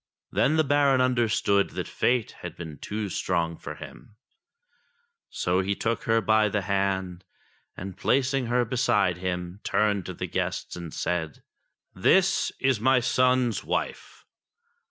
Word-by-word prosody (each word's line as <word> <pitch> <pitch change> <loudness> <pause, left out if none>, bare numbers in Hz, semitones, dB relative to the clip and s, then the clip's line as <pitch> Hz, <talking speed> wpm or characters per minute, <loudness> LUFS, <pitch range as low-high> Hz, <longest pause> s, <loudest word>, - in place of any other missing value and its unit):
Then 155 - +2
the 160 - +4
Baron 140 -2 +3
understood 115 -5 +2
that - - -2
Fate 120 -2 0
had 90 -2 -7
been 80 -5 -8
too 105 0 -4
strong 85 -3 -1
for - - -8
him; 105 - -12 1.1
so 90 +1 0
he 100 +1 -1
took 115 +3 -2
her 115 0 +3
by 110 -1 +3
the 100 0 -1
hand, 95 -2 -1 0.5
and, 95 0 -6
placing 130 +4 +1
her 120 +1 +2
beside 105 -6 +1
him, 90 0 -4
turned 105 -3 +1
to - - -6
the - - -4
guests - - -3
and 85 -3 -7
said: 80 -4 -3 0.5
"This 190 - +3
is 130 -4 +2
my 130 +3 +4
son's 125 -1 +2
wife. - - -4
105 Hz, 140 wpm, -26 LUFS, 90-125 Hz, 1.1 s, the